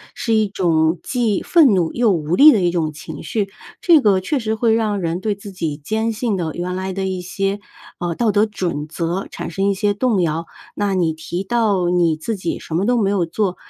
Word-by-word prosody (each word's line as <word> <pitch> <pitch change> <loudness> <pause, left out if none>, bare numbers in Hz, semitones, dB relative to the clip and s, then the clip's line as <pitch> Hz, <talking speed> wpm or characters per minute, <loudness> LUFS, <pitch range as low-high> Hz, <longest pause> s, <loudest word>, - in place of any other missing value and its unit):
是 230 - -1
一 215 -2 +2
种 165 -3 +1
既 235 -6 0
愤 310 -10 +5
怒 175 -4 +1
又 235 -3 +2
无 165 -2 0
力 300 +9 +9
的 220 - +3
一 175 -2 +1
种 165 -3 -1
情 155 0 -9
绪， 200 +5 -2 0.3
这 330 -4 +5
个 200 -5 +3
确 190 +11 -1
实 220 -4 -1
会 220 0 +2
让 215 -3 0
人 170 0 -2
对 210 +1 0
自 200 0 -10
己 160 -5 -3
坚 220 +9 -2
信 225 -1 -1
的 170 -4 -2
原 180 +1 -3
来 190 +1 -3
的 190 +1 -3
一 185 -1 -3
些， 195 +3 -2 0.4
呃， 175 -1 -2
道 230 +5 0
德 210 +1 +3
准 180 -8 -3
则 170 +4 -3
产 - - -6
生 195 +4 0
一 - - +2
些 205 +1 0
动 215 -2 +1
摇。 165 0 -1 0.3
那 205 -1 0
你 170 -4 +1
提 175 +4 -5
到 205 -5 +1
你 170 -3 +2
自 220 +8 -3
己 180 -4 -3
什 - - -9
么 175 +5 +1
都 245 0 +2
没 195 - +2
有 195 -4 +1
做， 185 +2 -1
190 Hz, 245 characters per minute, -19 LUFS, 170-215 Hz, 0.4 s, 力